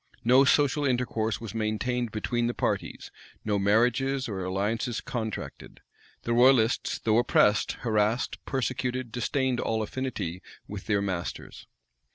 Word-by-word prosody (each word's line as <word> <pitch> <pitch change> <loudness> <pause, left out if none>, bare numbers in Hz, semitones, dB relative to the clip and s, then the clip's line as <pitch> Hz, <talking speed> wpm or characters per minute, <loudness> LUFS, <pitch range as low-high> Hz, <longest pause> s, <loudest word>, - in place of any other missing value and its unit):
No 130 +4 +6
social 145 +1 +3
intercourse 120 -4 0
was 115 -4 -7
maintained 115 +2 -1
between 120 +2 -1
the 120 - -2
parties; - - -3 0.3
no 105 -2 +1
marriages 125 +6 +2
or 95 -4 -4
alliances 105 +6 -1
contracted. 110 -3 -6 0.4
The 120 - -1
royalists, 120 -1 +4
though 110 0 +2
oppressed, 105 -3 +3
harassed, 110 +1 0
persecuted, 130 -2 -2
disdained 125 +2 -1
all 110 -1 -1
affinity 110 -8 -4 0.3
with 100 -2 -8
their 100 -2 +1
masters. 90 -3 -5
115 Hz, 125 wpm, -27 LUFS, 105-125 Hz, 0.4 s, No